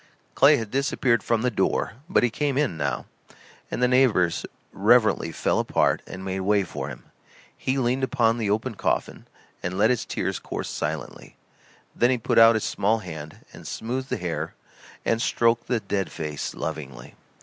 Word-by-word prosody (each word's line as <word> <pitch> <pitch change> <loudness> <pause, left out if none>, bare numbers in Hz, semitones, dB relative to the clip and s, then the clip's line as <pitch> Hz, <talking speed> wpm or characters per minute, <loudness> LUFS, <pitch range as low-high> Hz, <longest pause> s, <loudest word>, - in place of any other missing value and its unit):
Clay 145 +2 +6
had 110 -4 -5
disappeared 130 -3 +1
from 115 -1 0
the 125 - +1
door; - - 0 0.2
but 190 - +3
he 120 - +2
came 140 +1 -1
in, 140 - +1
now, 70 -4 -2 0.6
and 125 - -2
the - - +6
neighbors 125 -9 +3 0.3
reverently - - +3
fell - - 0
apart - - +1
and 95 +1 -8
made 95 0 -2
way 100 +1 +2
for 75 -6 -5
him. 65 -4 -9 0.5
He 130 +1 -1
leaned 130 +1 0
upon 120 -4 +2
the 110 -3 -1
open 110 +4 0
coffin - - -2 0.3
and 90 +1 -3
let 110 +4 +4
his 125 - 0
tears - - -3
course - - -5
silently. - - -5 0.6
Then 120 - +3
he 130 - +2
put 115 - +2
out 115 0 +8
his 110 - 0
small 105 +3 +1
hand 80 -7 -9
and - - -11
smoothed 130 +4 -4
the - - -1
hair 90 -2 -4 0.5
and 115 0 +1
stroked 115 -1 +2
the 120 -2 +1
dead 100 -3 -2
face 75 -2 -4
lovingly. 75 -5 -6
115 Hz, 175 wpm, -25 LUFS, 90-125 Hz, 0.6 s, out